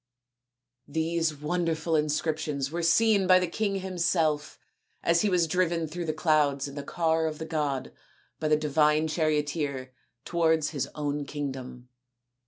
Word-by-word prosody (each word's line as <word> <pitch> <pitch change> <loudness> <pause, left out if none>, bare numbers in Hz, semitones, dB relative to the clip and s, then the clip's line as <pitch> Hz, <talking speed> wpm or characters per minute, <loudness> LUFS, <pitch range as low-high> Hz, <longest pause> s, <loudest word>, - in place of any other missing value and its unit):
These 160 +1 0
wonderful 165 +1 -1
inscriptions 150 -2 -1
were 170 +1 -2
seen 200 +3 +4
by 185 0 +7
the 180 - +1
king 195 +2 -2
himself 165 -5 0 0.5
as 170 0 +3
he 210 - +2
was 180 -3 +3
driven 170 -1 0
through 170 +3 -5
the 155 - 0
clouds 150 -3 +1
in 140 - -9
the 145 - -5
car 160 +2 0
of 155 -1 -4
the 160 - -5
god 145 -5 -2 0.5
by 155 - -1
the 150 0 +4
divine 150 +1 +2
charioteer 150 -4 -1 0.3
towards 160 -3 +1
his 140 -4 -3
own 145 -1 -2
kingdom. 130 -4 -6
155 Hz, 145 wpm, -28 LUFS, 150-170 Hz, 0.5 s, by